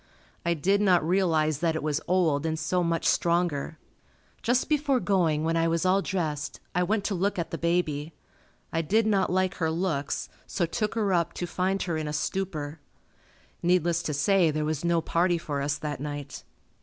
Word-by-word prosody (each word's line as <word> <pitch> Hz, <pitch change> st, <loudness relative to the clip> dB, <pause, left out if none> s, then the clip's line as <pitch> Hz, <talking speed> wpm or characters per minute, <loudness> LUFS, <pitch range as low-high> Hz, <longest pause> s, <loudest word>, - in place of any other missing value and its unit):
I 170 Hz, 0 st, +1 dB
did 195 Hz, +6 st, +2 dB
not 180 Hz, -5 st, +3 dB
realize 160 Hz, -5 st, +2 dB
that 165 Hz, -1 st, +1 dB
it 160 Hz, -, -3 dB
was 155 Hz, 0 st, 0 dB
old 165 Hz, -6 st, +2 dB
and 160 Hz, 0 st, -1 dB
so 180 Hz, +3 st, 0 dB
much 165 Hz, -1 st, -1 dB
stronger. 170 Hz, -3 st, +1 dB, 0.6 s
Just 245 Hz, +2 st, +1 dB
before 290 Hz, -4 st, +2 dB
going, 170 Hz, -8 st, +1 dB
when 165 Hz, +1 st, +1 dB
I 165 Hz, 0 st, +2 dB
was 165 Hz, +1 st, 0 dB
all 190 Hz, +2 st, +4 dB
dressed, 155 Hz, -7 st, -3 dB
I 180 Hz, -, +1 dB
went 205 Hz, +3 st, +1 dB
to 200 Hz, -, -1 dB
look 195 Hz, +2 st, 0 dB
at 170 Hz, -, -3 dB
the 165 Hz, -, -3 dB
baby. 165 Hz, -3 st, -1 dB, 0.6 s
I 165 Hz, -, +1 dB
did 215 Hz, +8 st, +2 dB
not 200 Hz, -4 st, +2 dB
like 185 Hz, 0 st, +1 dB
her 160 Hz, -3 st, 0 dB
looks, 160 Hz, -4 st, -1 dB, 0.2 s
so 175 Hz, -, 0 dB
took 210 Hz, +6 st, -2 dB
her 205 Hz, -4 st, +1 dB
up 170 Hz, -1 st, +1 dB
to 175 Hz, -, -3 dB
find 185 Hz, +2 st, -1 dB
her 170 Hz, -3 st, -2 dB
in 155 Hz, -1 st, -3 dB
a 150 Hz, -, -3 dB
stupor. 155 Hz, -2 st, -3 dB, 0.8 s
Needless 175 Hz, -1 st, +2 dB
to 150 Hz, -, -3 dB
say 175 Hz, +3 st, +3 dB
there 155 Hz, 0 st, -1 dB
was 155 Hz, 0 st, -2 dB
no 170 Hz, -1 st, +2 dB
party 175 Hz, +2 st, +1 dB
for 145 Hz, -4 st, -3 dB
us 145 Hz, +1 st, -1 dB
that 150 Hz, -3 st, -4 dB
night. 145 Hz, 0 st, -6 dB
170 Hz, 195 wpm, -27 LUFS, 155-185 Hz, 0.8 s, all